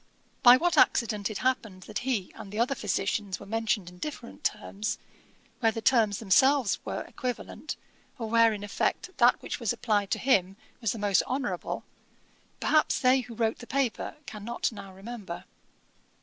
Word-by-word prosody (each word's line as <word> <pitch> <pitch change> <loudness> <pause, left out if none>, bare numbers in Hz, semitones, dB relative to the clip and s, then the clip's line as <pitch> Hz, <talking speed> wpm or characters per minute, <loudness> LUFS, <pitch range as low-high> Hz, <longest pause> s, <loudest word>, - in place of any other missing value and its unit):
'By 245 0 +9
what 330 0 +2
accident 210 -4 +3
it 215 - -4
happened 220 -8 0
that 215 - -4
he 240 -7 -1
and 195 - -10
the 210 - -6
other 240 +4 +2
physicians 205 -3 -1
were - - -10
mentioned 220 -2 -1
in 180 0 -11
different 280 -3 -7
terms, 210 0 -2 0.6
where 225 -2 +3
the 225 - -4
terms 220 -4 +3
themselves 255 +3 +3
were - - -3
equivalent, 250 -1 -5 0.4
or 230 - -4
where 230 0 +5
in 205 -1 -5
effect 205 - -1
that 240 -1 +5
which - - -4
was 230 -5 0
applied 205 -3 0
to - - +1
him 195 -7 +2 0.2
was 225 -4 +1
the - - -4
most 205 -2 +3
honourable, 245 -9 -2 0.8
perhaps 310 -1 +3
they 255 0 +5
who 245 -2 -7
wrote 225 -1 0
the 240 - -10
paper 270 +1 -1
cannot 235 -2 -3
now 195 -3 -9
remember. 195 -3 -7
225 Hz, 165 wpm, -28 LUFS, 200-250 Hz, 0.8 s, By